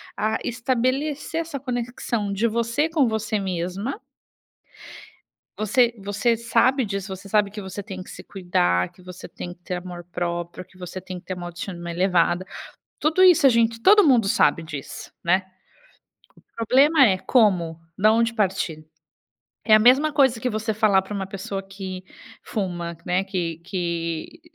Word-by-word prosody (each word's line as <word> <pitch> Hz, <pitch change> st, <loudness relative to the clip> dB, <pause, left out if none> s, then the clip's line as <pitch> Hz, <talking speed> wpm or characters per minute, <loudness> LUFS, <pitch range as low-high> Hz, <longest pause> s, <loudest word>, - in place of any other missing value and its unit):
a 220 Hz, +1 st, 0 dB
estabelecer 260 Hz, +6 st, -1 dB
essa 315 Hz, -4 st, -6 dB
conexão 240 Hz, -4 st, -3 dB
de 215 Hz, +4 st, +1 dB
você 235 Hz, +7 st, 0 dB
com 315 Hz, -5 st, +2 dB
você 220 Hz, -1 st, -1 dB
mesma. 190 Hz, -, -3 dB, 1.6 s
Você 235 Hz, +3 st, +2 dB
você 205 Hz, +4 st, 0 dB
sabe 250 Hz, +2 st, +2 dB
disso. 200 Hz, -1 st, -4 dB
Você 195 Hz, +1 st, -12 dB
sabe 205 Hz, -1 st, +2 dB
que 210 Hz, 0 st, -7 dB
você 190 Hz, +1 st, -7 dB
tem 190 Hz, -2 st, -7 dB
que -, -, -15 dB
se -, -, -10 dB
cuidar, 90 Hz, -, 0 dB
que -, -, -20 dB
você 180 Hz, 0 st, -10 dB
tem 175 Hz, -, -8 dB
que 175 Hz, -, -26 dB
ter 180 Hz, -, -4 dB
amor 180 Hz, -1 st, -7 dB
próprio, 175 Hz, +1 st, -4 dB
que 185 Hz, +1 st, -22 dB
você 180 Hz, 0 st, -7 dB
tem 185 Hz, 0 st, -7 dB
que -, -, -23 dB
ter 185 Hz, -, -4 dB
uma 175 Hz, -1 st, -6 dB
autoestima 175 Hz, 0 st, -6 dB
elevada, 180 Hz, 0 st, +1 dB, 0.5 s
tudo 320 Hz, +5 st, +3 dB
isso 355 Hz, -6 st, +6 dB
a 270 Hz, -, +9 dB
gente 230 Hz, -1 st, +2 dB
todo 410 Hz, -, +6 dB
mundo 240 Hz, -7 st, +4 dB
sabe 170 Hz, -3 st, +3 dB
disso, 150 Hz, -4 st, -8 dB
né. 185 Hz, +3 st, +2 dB, 0.9 s
O -, -, -26 dB
problema 280 Hz, +3 st, +5 dB
é 190 Hz, -2 st, +2 dB
como, 180 Hz, -10 st, +2 dB, 0.2 s
da 215 Hz, +2 st, +5 dB
onde 230 Hz, 0 st, +2 dB
partir? 185 Hz, -7 st, -1 dB, 0.8 s
É 215 Hz, -, +4 dB
a 215 Hz, -, +6 dB
mesma 265 Hz, +7 st, +5 dB
coisa 265 Hz, -5 st, +3 dB
que 250 Hz, +2 st, -1 dB
você 215 Hz, 0 st, -2 dB
falar 205 Hz, -3 st, +3 dB
para 190 Hz, +2 st, -8 dB
uma 195 Hz, -2 st, -3 dB
pessoa 195 Hz, 0 st, -5 dB
que 190 Hz, -1 st, -7 dB, 0.4 s
fuma, 175 Hz, -5 st, -4 dB
né, 180 Hz, +2 st, +1 dB
que 175 Hz, -4 st, -3 dB
que 170 Hz, -, -4 dB
200 Hz, 165 wpm, -23 LUFS, 180-235 Hz, 1.6 s, a